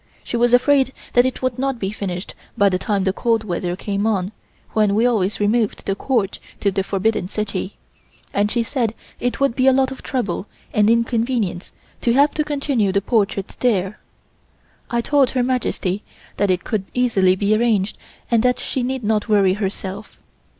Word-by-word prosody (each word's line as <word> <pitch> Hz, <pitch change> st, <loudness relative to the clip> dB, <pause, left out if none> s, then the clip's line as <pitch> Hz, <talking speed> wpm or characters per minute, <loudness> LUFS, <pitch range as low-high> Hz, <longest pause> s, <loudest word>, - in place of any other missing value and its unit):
She -, -, -4 dB
was 240 Hz, 0 st, +3 dB
afraid 265 Hz, +1 st, +4 dB, 0.2 s
that 245 Hz, +1 st, +5 dB
it 260 Hz, -, -5 dB
would 255 Hz, -1 st, -1 dB
not 270 Hz, -1 st, 0 dB
be 195 Hz, -3 st, -3 dB
finished 190 Hz, -3 st, -5 dB, 0.2 s
by 200 Hz, 0 st, +5 dB
the 185 Hz, -1 st, 0 dB
time 200 Hz, -2 st, 0 dB
the 190 Hz, 0 st, +1 dB
cold 225 Hz, 0 st, +1 dB
weather 175 Hz, -2 st, -2 dB
came 200 Hz, +2 st, -2 dB
on, 195 Hz, -3 st, 0 dB, 0.4 s
when 210 Hz, -2 st, +2 dB
we 225 Hz, +3 st, +3 dB
always 215 Hz, -5 st, +1 dB
removed 210 Hz, +1 st, +1 dB
the 195 Hz, -, 0 dB
Court 205 Hz, -2 st, -1 dB, 0.2 s
to 200 Hz, -, +1 dB
the 195 Hz, 0 st, 0 dB
Forbidden 200 Hz, 0 st, 0 dB
City, 200 Hz, -1 st, -3 dB, 0.6 s
and 205 Hz, +1 st, +2 dB
she 235 Hz, +1 st, 0 dB
said 230 Hz, -3 st, -1 dB, 0.2 s
it 245 Hz, -, -2 dB
would 275 Hz, -4 st, +2 dB
be 260 Hz, 0 st, +2 dB
a -, -, +8 dB
lot 265 Hz, 0 st, +2 dB
of 265 Hz, -, -8 dB
trouble 210 Hz, -6 st, -2 dB, 0.3 s
and 210 Hz, 0 st, +4 dB
inconvenience 230 Hz, -5 st, 0 dB, 0.3 s
to 235 Hz, -, +2 dB
have 285 Hz, +3 st, +4 dB
to 305 Hz, -, 0 dB
continue 275 Hz, -8 st, 0 dB
the 200 Hz, -, +2 dB
portrait 200 Hz, -2 st, 0 dB
there. 205 Hz, -5 st, 0 dB, 0.9 s
I 235 Hz, -1 st, 0 dB
told 280 Hz, +1 st, +3 dB
Her 255 Hz, -2 st, 0 dB
Majesty 230 Hz, -6 st, -1 dB, 0.4 s
that 205 Hz, -, +1 dB
it 180 Hz, -1 st, +1 dB
could 210 Hz, -4 st, -2 dB
easily 200 Hz, -7 st, +3 dB
be 205 Hz, +2 st, +2 dB
arranged 215 Hz, -3 st, +1 dB, 0.4 s
and 230 Hz, -2 st, +4 dB
that 250 Hz, +1 st, +2 dB
she 260 Hz, -, -3 dB
need 255 Hz, 0 st, -2 dB
not 215 Hz, +1 st, 0 dB
worry 200 Hz, -3 st, +4 dB
herself. 195 Hz, 0 st, -5 dB
215 Hz, 185 wpm, -21 LUFS, 195-245 Hz, 0.9 s, a